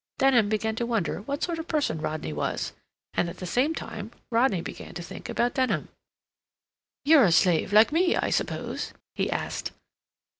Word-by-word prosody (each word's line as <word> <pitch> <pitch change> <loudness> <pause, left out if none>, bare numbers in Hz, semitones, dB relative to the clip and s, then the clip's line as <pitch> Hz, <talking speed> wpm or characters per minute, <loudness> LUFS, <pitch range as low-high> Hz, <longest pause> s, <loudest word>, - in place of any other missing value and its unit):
Denham 245 -6 +4
began 220 +1 0
to 235 - 0
wonder 225 -6 -1
what 280 +7 -3
sort 340 -2 -1
of 325 - -6
person 285 - 0
Rodney 155 - -3
was, 75 - -2 0.4
and 170 - +1
at - - -9
the 185 - -6
same 260 - +1
time 215 -7 -6 0.2
Rodney 230 -5 +3
began - - -8
to 175 - -5
think - - -9
about 240 +1 +1
Denham. 260 -1 0 1.2
"You're 295 -4 +7
a 180 - +3
slave 170 +1 +3
like 215 +4 +6
me, 350 +3 +3
I - - 0
suppose?" - - -2 0.2
he - - -1
asked. - - -3
225 Hz, 175 wpm, -27 LUFS, 180-275 Hz, 1.2 s, You're